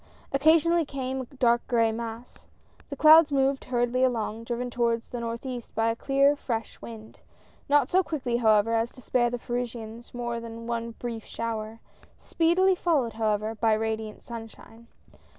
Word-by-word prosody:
Occasionally 325 +4 +4
came 265 -2 -4
a - - -6
dark 240 -2 +1
gray 230 -2 +2
mass. 230 +1 -8 0.4
The 280 - -5
clouds 310 +1 +7
moved 270 0 +1
hurriedl}^ 245 0 +1
along, 230 -3 -1
driven 245 +1 -3
towards 235 -1 0
the 245 - -5
northeast 235 +1 -6
by 225 0 +2
the - - -10
clear 275 +3 +3
fresh 230 -5 -5
wind. 220 -1 -11 0.5
Not 285 -2 +3
so 375 - +5
quickly, 260 -9 -2
however, 220 -1 +3
as 230 +1 +1
to 255 - -14
spare 240 -1 +1
the 245 - -3
Parisians 235 -1 -5
more 240 -1 -4
than 230 0 -8
one 230 0 -3
brief 230 -2 -6
shower, 225 -1 -5 0.4
speedily 350 +3 +2
followed, 300 -10 0
how 220 -1 0
ever, 215 +2 -2
by 225 0 +2
radiant 220 0 -3
sunshine. 230 0 -11
235 Hz, 160 wpm, -27 LUFS, 225-265 Hz, 0.5 s, clouds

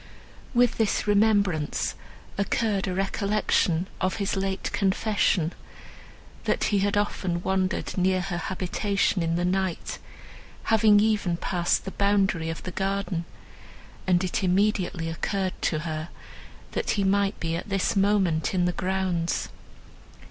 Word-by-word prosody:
With 245 -1 +3
this 220 -3 +1
remembrance 200 -7 +2 0.4
occurred 200 0 0
a 185 - -1
recollection 195 -3 +1
of 185 0 +1
his 200 -2 -1
late 195 0 -2
confession—that 190 -4 -2
he 205 - +2
had 205 +1 +1
often 185 -4 -1
wandered 190 -1 -1
near 185 0 +2
her 175 -1 -3
habitation 190 +2 0
in 165 0 0
the 175 +1 0
night, 185 -1 -1 0.7
having 215 -1 +6
even 205 -5 +1
passed 175 -1 0
the 195 - -4
boundary 195 -5 +1
of 165 - -5
the 185 - -5
garden, 195 -2 -2 0.8
and 180 0 +3
it 185 +2 -1
immediately 185 -2 +1
occurred 185 +3 -2
to 155 -2 0
her, 155 0 -4 0.6
that - - -2
he 200 - +2
might 200 +1 +1
be 165 -1 -2
at 175 - -5
this 195 +3 0
moment 195 -5 +2
in 180 -1 +2
the 180 - +2
grounds. 185 -2 -1
190 Hz, 130 wpm, -26 LUFS, 175-200 Hz, 0.8 s, having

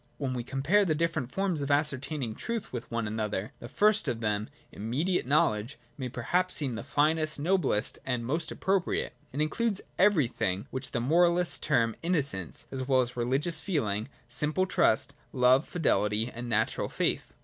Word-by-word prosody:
" - - -37
^hen 135 -3 -2
we 125 -1 -3
compare 140 - +2
the 165 -5 +1
different 155 -5 -1
forms 190 -6 -1
of 140 - -3
ascertaining 145 -3 0
truth 230 - -4
with 120 -1 -5
one 115 -1 -2
another, 105 -1 -3
the 120 - -9
first 215 +1 +3
of 115 - -1
them, 105 -1 -1 0.2
immediate 130 - -1
know 145 -3 +4
ledge, 105 +5 -6 0.2
may 130 -3 -4
perhaps 180 +11 0
seem 140 -5 0
the 115 - -5
finest, 155 +2 +1
noblest 150 - +1
and 125 -3 -2
most 155 +7 -2
i - - -6
appropriate. 190 -1 0 0.2
It 140 - -2
includes 200 +7 0 0.2
everything 120 - +2
which 130 0 -4
the 120 - -2
moralists 170 +5 +3
term 115 -7 +1
innocence 140 - -2
as 130 -1 -4
well 130 -2 +4
as 125 0 -4
religious 135 +7 +1
feeling, 115 - -1 0.2
simple 150 +9 +2
trust, 140 -7 +2 0.2
love, 130 +2 +4
fidelity, 110 -8 +1
and 120 +1 -6
natural 110 -1 0
faith. - - -1
135 Hz, 170 wpm, -29 LUFS, 115-165 Hz, 0.2 s, know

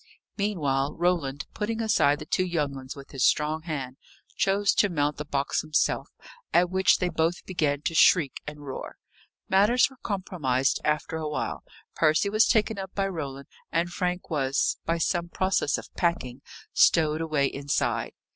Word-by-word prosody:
Meanwhile, 150 -9 -1
Roland, 165 -6 0
putting 220 +2 -3
aside 200 -10 +3
the 150 - -8
two 185 - +1
young 160 -6 -1
ones 130 -1 -8
with 140 -1 -12
his 135 -3 -2
strong 155 +3 +2
hand, 140 -6 -5 0.4
chose 195 +1 +2
to 205 - +3
mount 150 -3 0
the 150 - -5
box 140 -1 -1
himself; 155 -1 0 0.4
at 175 0 +3
which 190 0 +4
they 180 - 0
both 165 +1 -1
began 150 -5 -1
to - - -1
shriek 160 -3 +4
and 150 -1 -8
roar. 135 - -7 0.5
Matters 235 +9 +4
were 265 - -17
compromised 160 - -1
after 150 +1 -1
a 155 -1 -3
while; 150 - -3 0.3
Percy 155 +5 +2
was 215 +2 +4
taken 220 -2 +2
up 190 -1 -6
by 195 -1 +1
Roland, 140 -7 -6 0.2
and 170 +1 0
Frank 180 0 -2
was, 135 -3 0
by 165 +1 0
some 170 +1 -1
process 185 -5 +1
of - - -10
packing, 135 -7 -1 0.3
stowed 155 -1 +4
away 155 -4 +1
inside. 140 +1 -1
160 Hz, 165 wpm, -26 LUFS, 145-185 Hz, 0.5 s, which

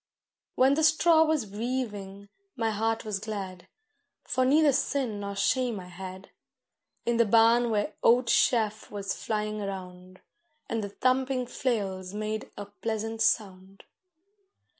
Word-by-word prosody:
When 265 +2 +4
the 315 +2 +1
straw 320 +1 +5
was 310 -6 0
weaving 205 -3 -4 0.3
my 225 -3 0
heart 225 +2 -1
was 210 -2 -2
glad, 195 -4 -6 0.6
For 255 +1 0
neither 295 +3 +5
sin 260 -5 -1
nor 200 0 -5
shame 230 +3 +1
I 180 -1 -10
had, 185 +1 -9 0.7
In 235 0 +1
the 235 - +4
barn 230 +2 +4
where 210 -1 0
oat 245 +2 +5
chaff 225 -5 +2
was 200 -1 -3
flying 215 -1 -3
round, 185 -2 -7 0.5
And 225 -2 -2
the 200 - -4
thumping 255 +3 0
flails 200 -7 -3
made 215 +1 -3
a 205 - -5
pleasant 220 +2 -4
sound. 195 -3 -1
215 Hz, 135 wpm, -28 LUFS, 200-250 Hz, 0.7 s, straw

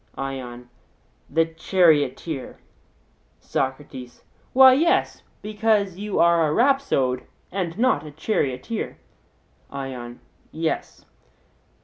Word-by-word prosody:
ION: 125 -3 -6 0.6
The 165 +3 +3
charioteer. 160 -4 +1 0.8
SOCRATES: 130 -2 -4 0.3
Why, 260 0 +8
yes, 325 +6 +1 0.2
because 210 -3 +1
you 210 0 -3
are 170 -1 +4
a - - 0
rhapsode 185 - +1 0.2
and 180 -2 -3
not 255 +3 +2
a 155 - -8
charioteer. 150 - -2 0.7
ION: 130 -3 -7 0.3
Yes. 160 0 -3
160 Hz, 85 wpm, -23 LUFS, 135-210 Hz, 0.8 s, Why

